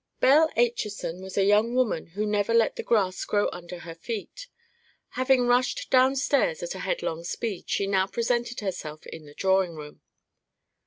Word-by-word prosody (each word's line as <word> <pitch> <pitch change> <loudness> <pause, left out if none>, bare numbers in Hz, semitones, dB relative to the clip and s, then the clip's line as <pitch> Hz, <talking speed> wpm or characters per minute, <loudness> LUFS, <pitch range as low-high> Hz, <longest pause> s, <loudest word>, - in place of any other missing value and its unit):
Belle 305 +5 +5
Acheson 210 -7 -1
was 190 +1 -8
a 195 - +4
young 210 +4 +3
woman 250 -10 0
who 210 - 0
never 210 +2 +1
let 230 -1 +3
the - - -4
grass 190 -5 +1
grow 205 -1 +1
under 175 0 -8
her 165 -1 -8
feet. 230 - -7 0.6
Having 255 -1 +2
rushed 245 +1 +1
downstairs 275 - +2
at - - -4
a - - -8
headlong 170 - -3
speed, 200 +2 -4
she 200 - 0
now 190 -1 +1
presented 240 +2 -1
herself 155 -6 -5
in 160 -1 -10
the 145 - -15
drawing 190 -3 +1
room. 150 -1 -10
210 Hz, 165 wpm, -26 LUFS, 185-245 Hz, 0.6 s, Belle